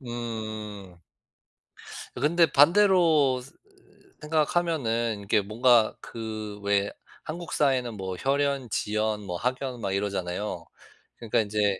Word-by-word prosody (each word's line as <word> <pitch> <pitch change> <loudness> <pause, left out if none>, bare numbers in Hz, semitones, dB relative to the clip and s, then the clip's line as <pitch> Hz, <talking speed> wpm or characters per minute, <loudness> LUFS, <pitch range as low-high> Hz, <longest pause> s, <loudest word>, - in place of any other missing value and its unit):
음. 110 -6 -6 1.2
근데 165 +6 +3
반대로 160 -3 +4 0.8
생각하면은 150 -8 0
이게 105 - +3
뭔가 115 +2 +3
그 110 -2 -6
왜 100 0 +1 0.3
한국 170 +1 -6
사회는 130 -5 +1
뭐 95 -1 -5
혈연 140 0 0
지연 105 +1 -1
뭐 90 -2 -4
학연 125 +3 -3
막 100 -3 -2
이러잖아요. 100 -2 -3 0.5
그러니까 115 -3 0
이제 105 -2 0
115 Hz, 215 characters per minute, -27 LUFS, 105-140 Hz, 1.2 s, 반대로